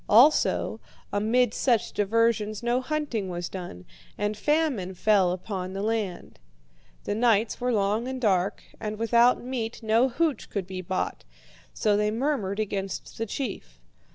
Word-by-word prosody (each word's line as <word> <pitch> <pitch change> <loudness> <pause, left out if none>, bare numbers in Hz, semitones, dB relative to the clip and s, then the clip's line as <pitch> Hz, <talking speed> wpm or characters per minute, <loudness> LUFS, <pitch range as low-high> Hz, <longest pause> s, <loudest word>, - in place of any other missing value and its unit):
Also, 250 +9 +4 0.3
amid 220 +3 +2
such 240 -5 +1
diversions 215 0 +1
no 240 +2 +1
hunting 260 -8 -2
was 175 -1 -4
done, 175 - -7 0.3
and 210 +1 -1
famine 260 - 0
fell 195 -2 +3
upon 185 0 -4
the 195 +1 -3
land. 215 -4 -3 0.6
The - - -2
nights 225 0 +2
were 250 0 +1
long 210 +2 +1
and 260 0 -4
dark, 200 -3 +1 0.2
and 215 -1 -4
without 235 +2 +4
meat 240 -2 -4
no 225 +4 +3
hooch 310 +3 -1
could 200 -3 -3
be 185 0 -6
bought; 185 +1 -3 0.5
so 210 -2 +1
they 210 0 +2
murmured 220 -4 -1
against 195 -2 -4
the 225 - -1
chief. 195 - -5
215 Hz, 145 wpm, -26 LUFS, 195-240 Hz, 0.6 s, Also